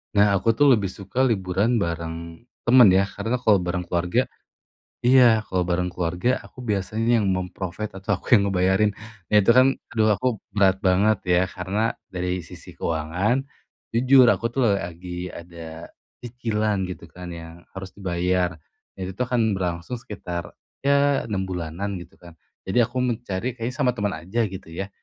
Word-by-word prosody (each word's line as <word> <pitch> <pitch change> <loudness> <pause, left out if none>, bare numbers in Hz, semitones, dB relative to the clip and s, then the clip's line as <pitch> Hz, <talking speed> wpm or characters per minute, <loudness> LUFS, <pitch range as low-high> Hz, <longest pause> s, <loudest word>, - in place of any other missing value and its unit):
Nah, 100 0 +5
aku 100 +4 +2
tuh 130 +6 +3
lebih 100 -4 -2
suka 100 +7 -2
liburan 105 0 +1
bareng 85 0 -4 0.2
temen 125 -1 +8
ya, 95 +1 +3
karena 120 +2 -1
kalau 105 -6 +3
bareng 90 0 -3
keluarga 90 0 0 0.8
iya, 120 -4 +6
kalau 90 -1 -1
bareng 90 0 0
keluarga 90 +8 0
aku - - -17
biasanya 110 +4 +1
yang 100 - 0
mem-provide 95 +2 -4
atau 100 -1 0
aku - - 0
yang 100 -2 +3
ngebayarin. 95 +3 +3 0.4
Nah, - - +3
itu 100 - +5
kan 130 +1 +7 0.3
aduh 110 -1 +3
aku 130 - -1 0.2
berat 95 -2 +3
banget 100 +3 +3 0.2
ya, 90 - +4
karena 95 +5 -2 0.2
dari 90 0 -2
sisi - - -12
keuangan, 85 - 0 0.6
jujur 130 +2 +6
aku - - -5
tuh 135 - -1
lagi 90 0 -6
ada 85 -1 -9 0.3
cicilan 110 -4 -1
gitu 90 -1 -8
kan, 90 0 -8
yang 85 -1 -9 0.2
harus 95 -1 -7
dibayar. 90 -2 -1 0.4
Itu 95 0 -5
tuh 125 - 0
akan 115 -4 +2
berlangsung 90 +4 -3
sekitar, 85 -4 -6 0.3
ya 140 0 +3
6 95 -2 -1
bulanan 90 +2 -4
gitu - - -15
kan, 85 -1 -14 0.3
jadi 120 +6 +3
aku 125 - -6
mencari 120 -1 -2
kayaknya 120 +1 -4
sama 125 -3 +2
teman 105 -3 -1
aja 95 +9 -2
gitu 95 0 -8
ya. 95 +4 -4
95 Hz, 160 wpm, -24 LUFS, 90-115 Hz, 0.8 s, temen